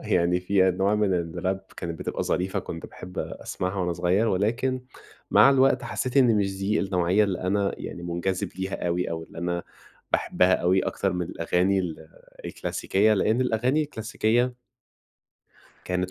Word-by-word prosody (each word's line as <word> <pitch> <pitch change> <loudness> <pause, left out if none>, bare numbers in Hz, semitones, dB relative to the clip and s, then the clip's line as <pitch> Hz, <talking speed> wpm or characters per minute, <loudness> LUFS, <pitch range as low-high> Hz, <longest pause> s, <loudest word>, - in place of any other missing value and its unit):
يعني 90 0 +3
في 95 0 +3
أنواع 95 +3 +1
من 105 -2 +2
الراب 90 +3 -2 0.2
كانت 85 -3 -5
بتبقى - - -3
ظريفة، 95 +1 -1
كنت - - -6
باحب 90 0 -10
أسمعها 95 +2 -4
وأنا 90 -1 0
صغير، 90 +6 +1
ولكن 120 +7 0 0.5
مع 135 - +7
الوقت 135 -1 +4
حسّيت 130 +1 -3
إن 125 -5 +5
مش 95 -2 -1
دي 100 +2 +1
النوعية 95 +1 +2
اللي 95 -3 -2
أنا 100 +2 0
يعني 85 - -7
مُنجذب 90 +2 -2
ليها 95 -1 -3
أوي، 90 +1 -1
أو 80 0 -3
اللي - - -12
أنا 85 0 -2 0.5
باحبها 90 0 +3
أوي 90 +2 +2
أكتر 95 0 -1
من 90 -1 -2
الأغاني 90 +4 +1
ال 80 -3 -4 0.4
الكلاسيكية، 105 +3 +1
لإن 110 +4 +2
الأغاني 125 +5 +1
الكلاسيكية 120 -1 0 1.3
كانت 90 0 -1
95 Hz, 155 wpm, -26 LUFS, 90-110 Hz, 1.3 s, مع